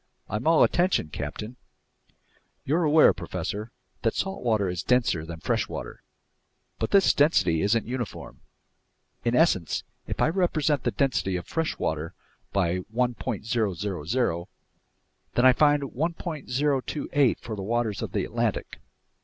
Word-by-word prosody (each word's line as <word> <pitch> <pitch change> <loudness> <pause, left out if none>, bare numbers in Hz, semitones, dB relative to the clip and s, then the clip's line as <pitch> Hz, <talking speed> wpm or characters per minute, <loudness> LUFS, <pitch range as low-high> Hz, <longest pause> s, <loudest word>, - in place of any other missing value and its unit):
"I'm 110 +7 -3
all 165 -1 +6
attention, 175 - +2
captain." 105 +13 -6 1.1
"You're 160 +5 +2
aware, 155 +1 +6
professor, 105 +3 -5 0.3
that 115 -2 0
salt 195 0 -2
water 110 -5 +2
is 90 -2 -2
denser 115 -11 +1
than 85 -1 -8
fresh - - 0
water, - - -7 0.8
but - - -1
this 195 -1 +5
density 95 - +3
isn't 110 +3 +2
uniform. 120 -1 -6 0.8
In 120 0 +1
essence, 95 - +2 0.2
if - - -4
I - - +3
represent 160 -6 +1
the - - +3
density 130 -9 0
of 90 - -4
fresh 165 -1 -2
water 80 +1 -3 0.4
by 90 -2 +1
1.000, 110 - -1 0.9
then 120 - +4
I 130 - +8
find 145 +1 +3
1.028 145 -2 -1
for 110 - -6
the 100 - -6
waters 110 0 -1
of - - -4
the - - 0
Atlantic, - - -2
1. - - -29
120 Hz, 135 wpm, -26 LUFS, 95-145 Hz, 1.1 s, I